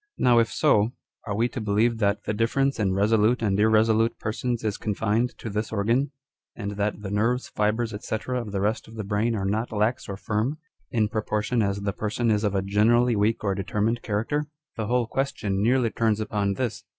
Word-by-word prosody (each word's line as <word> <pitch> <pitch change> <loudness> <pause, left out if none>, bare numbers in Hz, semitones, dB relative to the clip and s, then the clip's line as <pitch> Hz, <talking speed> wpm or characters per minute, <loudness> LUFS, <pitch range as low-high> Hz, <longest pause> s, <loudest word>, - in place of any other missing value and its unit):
Now 120 -2 +5
if 115 - +1
so, 105 +4 +3 0.3
are 105 - -2
we 115 +3 +2
to 120 - -5
believe 110 +3 +1
that 100 -1 +1
the - - -2
difference 135 +5 +1
in 95 -3 +1
resolute 110 +4 +3
and 100 -2 +1
irresolute 110 +1 +3
persons 115 +2 -2
is 105 -2 -2
confined 110 +3 0
to - - -7
this 105 +1 -3
organ, 115 +7 +1 0.5
and 100 -3 -4
that 105 +1 -2
the 95 - -4
nerves, 115 +5 0
fibres, 110 +2 0
&c. 110 - -1
of 125 -4 -2
the 100 -1 -2
rest 105 +3 -1
of 110 - -12
the 110 - -4
brain 105 +3 0
are 100 -2 -2
not 110 +4 -1
lax 110 +4 0
or 100 - -4
firm, 110 +8 -1 0.3
in 110 -5 +1
proportion 110 +2 -1
as 100 -1 -1
the 100 -1 -1
person 110 +3 -1
is 105 0 +1
of 100 -2 0
a 95 - +1
generally 115 +5 +3
weak 105 +3 +1
or 100 -2 +1
determined 105 +4 -1
character? 120 +8 -1 0.3
The 110 -2 -3
whole 125 +1 +2
question 105 -7 -2
nearly 120 +1 +2
turns 110 -2 +1
upon 100 -2 -1
this. 120 -1 -3
110 Hz, 200 wpm, -25 LUFS, 105-115 Hz, 0.5 s, Now